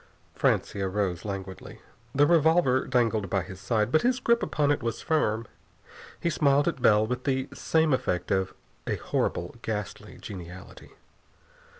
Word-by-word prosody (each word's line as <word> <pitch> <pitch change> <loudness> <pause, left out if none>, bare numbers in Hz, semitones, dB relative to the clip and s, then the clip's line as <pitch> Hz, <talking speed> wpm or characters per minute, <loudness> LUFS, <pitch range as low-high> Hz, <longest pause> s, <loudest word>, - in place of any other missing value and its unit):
Francia 100 -1 0
rose 95 -3 -2
languidly. 95 -2 -7 0.4
The 145 +1 +5
revolver 160 -4 +3
dangled 115 -6 +1
by 95 -1 0
his 95 +1 -10
side, 110 +1 0
but 155 - +4
his 250 +1 +1
grip 235 -1 +2
upon 145 -1 +1
it 145 - 0
was 115 -2 -3
firm. 115 -8 +1 0.7
He 170 - 0
smiled 145 -2 +3
at 135 - -1
Bell 105 -3 +5
with 125 +2 -3
the 130 0 0
same 160 -2 +1
effect 90 -8 -1
of 95 -1 0 0.3
a - - 0
horrible, 85 +7 -2
ghastly 105 +1 -5
geniality. 90 -2 -10
115 Hz, 150 wpm, -27 LUFS, 100-145 Hz, 0.7 s, The